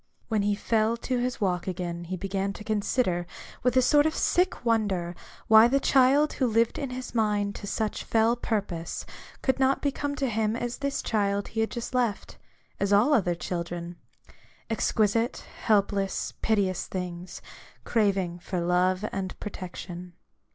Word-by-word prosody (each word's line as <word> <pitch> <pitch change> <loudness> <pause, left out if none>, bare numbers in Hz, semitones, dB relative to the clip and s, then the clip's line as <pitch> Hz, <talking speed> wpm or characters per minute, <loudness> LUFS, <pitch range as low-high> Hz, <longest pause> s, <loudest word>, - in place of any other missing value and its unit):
When 220 -3 +1
he 205 0 +1
fell 220 +2 +1
to 250 +1 -2
his 250 0 -2
walk 180 -4 0
again, 175 -2 -4
he 185 +2 -4
began 195 +1 -2
to 210 - -9
consider, 205 -4 0 0.3
with 250 +1 +2
a 255 - +6
sort 290 +4 +5
of 315 - -2
sick 360 -7 +1
wonder, 200 -7 +1 0.3
why 220 0 +8
the 275 +3 +2
child 275 +3 +4
who 260 - +1
lived 230 0 +2
in 275 - -3
his 255 0 -6
rnind 210 -3 +1
to 200 - -8
such 215 +1 -2
fell 225 +1 +3
purpose, 200 -8 -3 0.4
could 265 0 +1
not 265 0 +3
become 285 0 -2
to 275 -2 -1
him 220 -1 0
as 240 0 -3
this 280 0 -2
child 200 -2 0
he 225 - -4
had 220 - +1
just 235 +1 -5
left: 240 -5 -1 0.4
as 200 0 0
all 215 +9 +5
other 180 -9 +2
children, 175 0 -4 0.4
— - - -30
exquisite, 225 +1 +1 0.2
helpless, 200 -2 +1
piteous 195 -4 +1
things, 180 -1 -5 0.4
craving 195 -6 +1
for 180 +1 -3
love 180 +3 +2
and 190 -1 -4
protection. 180 -2 -7
210 Hz, 160 wpm, -27 LUFS, 185-240 Hz, 0.4 s, why